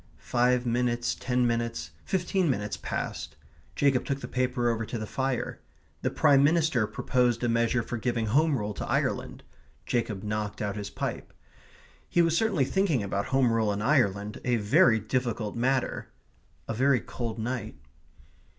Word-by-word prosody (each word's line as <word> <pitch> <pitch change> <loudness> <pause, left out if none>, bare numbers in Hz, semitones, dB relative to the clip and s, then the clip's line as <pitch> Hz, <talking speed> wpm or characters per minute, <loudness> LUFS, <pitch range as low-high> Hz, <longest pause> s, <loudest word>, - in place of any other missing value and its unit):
Five 125 0 +1
minutes, 120 0 0
ten 125 0 0
minutes, 115 -9 -1
fifteen 185 -1 0
minutes 105 -5 -1
passed. - - -4 0.4
Jacob 135 -3 +2
took 140 0 -2
the - - -6
paper 125 -1 0
over 115 0 -2
to 115 - -4
the 110 - -4
fire. 130 +1 -2 0.4
The - - 0
Prime 140 -1 +4
Minister 155 -7 +3
proposed 125 -1 0
a - - +2
measure 115 +1 +1
for 120 - -4
giving 120 0 -1
Home 145 +6 +3
Rule 105 -1 -3
to - - -5
Ireland. - - -1 0.4
Jacob 115 -5 -1
knocked 105 -1 -3
out 100 -1 -2
his 100 -1 -5
pipe. - - -4 0.8
He 175 - +4
was 165 -1 +2
certainly 195 -9 +2
thinking 165 - +1
about 100 0 -2
Home 130 -3 +3
Rule 110 -2 +2
in 100 +1 -2
Ireland 105 -6 +1
a 125 -1 +2
very 110 +1 +4
difficult 115 -1 -2
matter. 130 +2 0 0.6
A - - -2
very 130 +2 +3
cold 115 +3 -5
night. 115 -1 -3
120 Hz, 160 wpm, -28 LUFS, 110-130 Hz, 0.8 s, Prime